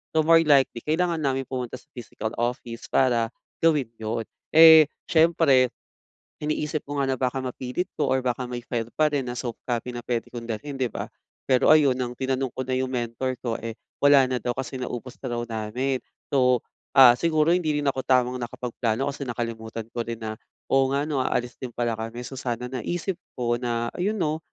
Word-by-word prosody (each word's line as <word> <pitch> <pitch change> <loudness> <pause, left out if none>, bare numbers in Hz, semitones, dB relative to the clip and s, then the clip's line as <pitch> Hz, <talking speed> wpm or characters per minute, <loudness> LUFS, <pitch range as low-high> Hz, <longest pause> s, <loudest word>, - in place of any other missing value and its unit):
So, 160 - +5
more 165 +1 +6
likely, 135 -5 +3
kailangan 170 +2 +1
namin 135 -3 -1
pumunta 125 -2 -4
sa 145 - -31
physical 110 -3 -6
office 120 -1 -3
para 120 -3 +2 0.3
gawin 150 -7 +2
'yon. 110 +1 -2 0.3
Eh, 160 -1 +10 0.2
syempre, 160 -6 +4 0.7
iniisip 150 0 -1
ko 145 0 -4
nga 135 - 0
na 130 - +1
baka 130 +1 -1
mapilit 130 +7 -3
ko 140 -4 +1
or 130 - +3
baka 125 0 -1
may 125 0 -5
file 120 -1 -4
pa 155 - +3
rin 140 -3 -1
na 120 - -4
soft 120 -3 -5
copy 120 0 -3
na 120 - -6
puwede 120 -2 -2
kong 120 -1 -7
dalhin, 135 +6 -5
'di 125 -4 -1
ba? - - -4 0.4
Pero 130 -2 +3
ayun, 140 -5 +4
nang 125 -1 -3
tinanong 130 -1 -1
ko 130 - -4
na 130 0 -2
yung 130 0 0
mentor 125 +1 -2
ko, 115 -2 -1
eh, 115 -1 -6 0.2
wala 145 -1 +6
na 130 - 0
daw 120 +1 -2
kasi 130 0 -5
naubos 125 0 -6
na 130 - -6
daw 120 - -2
namin. 120 +4 -2 0.3
So, 125 -3 +3 0.3
ah, 130 -3 +10
siguro 160 -1 +2
hindi 165 -4 +1
rin - - -4
ako 130 -1 -2
tamang 125 -1 +2
nakapagplano 120 +1 -2
kasi 140 0 -5
nakalimutan 115 -2 -4
ko 120 - -5
rin 115 -1 -6
na, 110 +1 -5 0.3
"Oo 135 0 +4
nga, 140 - +1
'no, 150 -3 -1
aalis 120 -1 -2
din 125 -3 -6
pala 120 -1 0
kami." 115 +2 -5
So, 130 +1 -7
sana 125 0 -3
naisip 175 - -3 0.2
ko 120 -1 0
na 120 -1 -2
ayun, 200 +5 -1
'no, 155 -4 0
130 Hz, 200 wpm, -25 LUFS, 120-140 Hz, 0.7 s, Eh